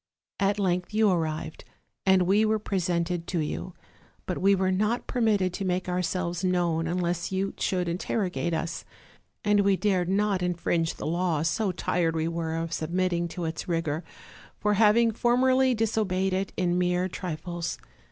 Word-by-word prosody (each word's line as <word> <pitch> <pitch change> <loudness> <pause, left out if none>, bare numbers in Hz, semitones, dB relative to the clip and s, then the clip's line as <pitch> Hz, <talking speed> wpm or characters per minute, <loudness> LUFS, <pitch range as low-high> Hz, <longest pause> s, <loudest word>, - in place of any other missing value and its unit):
"At 200 +1 +2
length 180 0 -1
you 215 -2 +4
arrived, 155 -2 -2 0.4
and 190 -1 +5
we 200 +4 +3
were 220 0 +2
presented 175 -4 -1
to 175 - -1
you; 160 +3 -4 0.5
but 180 - -3
we 195 +1 +4
were 190 0 +1
not 210 +6 0
permitted 210 -7 +1
to 195 - -4
make 185 -1 -1
ourselves 180 -1 -1
known 175 -3 +1
un 175 +2 -1
less 175 0 -1
you 190 +1 -1
should 180 -2 0
interrogate 180 0 -1
us; 165 0 -3 0.6
and 210 0 +4
we 200 -1 +3
dared 185 -4 +1
not 200 -1 +1
infringe 170 -2 0
the - - -7
law, 170 -1 0
so 185 +6 0
tired 170 -2 0
we 160 0 0
were 165 -1 -2
of 165 0 -3
submitting 175 +1 0
to 170 0 -5
its 160 +4 -4
rigor, 165 -2 -1 0.5
for 210 - +1
having 225 +2 +4
formerly 255 +3 +3
disobeyed 205 -4 0
it 190 +1 -1
in 180 -1 +1
mere 180 0 +1
trifles. 175 -1 -4
180 Hz, 160 wpm, -27 LUFS, 170-200 Hz, 0.6 s, and